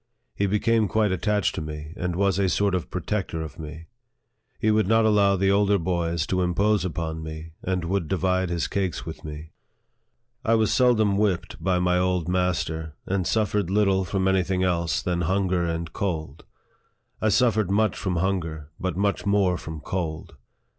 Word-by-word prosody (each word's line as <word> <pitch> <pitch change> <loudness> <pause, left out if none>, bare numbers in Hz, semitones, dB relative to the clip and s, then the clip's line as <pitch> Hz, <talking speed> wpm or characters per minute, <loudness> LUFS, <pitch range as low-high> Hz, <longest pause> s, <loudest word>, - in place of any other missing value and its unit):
He 100 - 0
be 105 +2 +2
came 115 -1 +2
quite 105 0 +1
attached 105 0 +1
to - - -4
me, 75 0 -7
and 90 -1 -2
was 100 0 +1
a 95 -1 +2
sort 100 +1 +1
of 90 -2 -2
protector 90 -2 -3
of 80 - -9
me. 80 +1 -8 0.7
He 110 - +2
would 110 -2 +2
not 115 +1 +4
allow 100 -2 +4
the 95 +1 +2
older 100 0 +3
boys 85 -2 -1
to 90 +1 0
impose 100 +4 +2
upon 80 -2 -3
me, 80 +1 -7
and 90 -2 -2
would 90 -1 -1
divide 95 0 0
his 85 -1 -1
cakes 95 -3 -2
with 80 - -8
me. 75 +1 -8 0.9
I 115 -1 +3
was 110 -1 +2
seldom 110 -6 +3
whipped 100 -5 -1
by 95 -1 +2
my 90 0 +2
old 90 -2 0
master, 85 -4 -1
and 95 -3 -1
suf 110 -3 +1
fered 105 -4 0
little 95 -1 +2
from 95 +1 -1
any 95 0 +3
thing 95 0 -1
else 85 -2 0
than 90 -1 -1
hunger 90 0 +1
and 85 -1 -3
cold. 80 -5 -3 0.8
I 110 - +3
suffered 110 -2 +3
much 105 0 +2
from 95 -2 -2
hunger, 85 -4 -2
but 90 -2 -2
much 100 0 0
more 100 -3 +3
from 80 -2 -7
cold. 80 -3 -4
95 Hz, 180 wpm, -25 LUFS, 85-100 Hz, 0.9 s, not